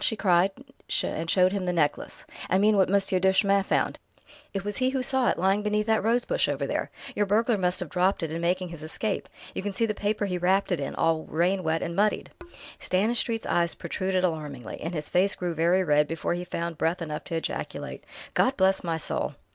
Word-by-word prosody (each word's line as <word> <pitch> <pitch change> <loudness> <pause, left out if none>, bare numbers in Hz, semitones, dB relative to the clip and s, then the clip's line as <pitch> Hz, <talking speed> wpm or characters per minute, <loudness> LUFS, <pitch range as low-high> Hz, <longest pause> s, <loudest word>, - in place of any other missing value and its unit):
she 220 - +1
cried, 185 -2 +3 0.5
and 165 +1 -3
showed 185 0 +4
him 195 -2 -2
the 180 - +1
necklace. 155 -4 -1 0.2
"I 185 - +3
mean, 210 +2 +4
what 190 -2 +3
Monsieur 195 -1 +2
Duchemin 195 +1 +3
found. - - 0 0.5
It 195 0 -4
was 205 -1 -3
he 255 0 +2
who 265 -1 -1
saw 260 0 +2
it, - - 0
lying 195 +3 +2
beneath 210 0 0
that 220 -1 +2
rose 235 +2 +2
bush - - +1
over - - -1
there. - - -2 0.3
Your 205 - +1
burglar 225 +3 +2
must 180 -2 +1
have 175 - -4
dropped 185 +1 +1
it 160 - -2
in 165 +1 -3
making 180 +1 0
his 170 -2 -9
escape; 195 +7 -3 0.2
you - - -3
can 200 +1 -3
see 230 - +2
the 215 - -1
paper 205 0 -1
he 180 -2 -2
wrapped 190 +3 +2
it 175 - +1
in, 140 - -4
all 165 -1 +1
rain 180 +4 +1
wet 160 -1 0
and 170 - -4
muddied." 210 +2 +1 0.5
Stanistreet's 225 +4 0
eyes 170 -1 +1
protruded 185 -1 -2
alarmingly, 150 -8 -3
and 165 +2 -4
his 150 -1 -3
face 190 +3 +2
grew 175 -1 -3
very 170 +4 +2
red 150 -2 +3
before 165 +1 -2
he 175 +1 -4
found 170 -2 -4
breath 165 +2 0
enough 150 -2 -5
to 165 - -4
ejaculate: 165 - -4 0.3
"God 265 - +2
bless 190 0 +3
my 165 -2 -1
soul!" 160 - -2
185 Hz, 220 wpm, -27 LUFS, 170-205 Hz, 0.5 s, showed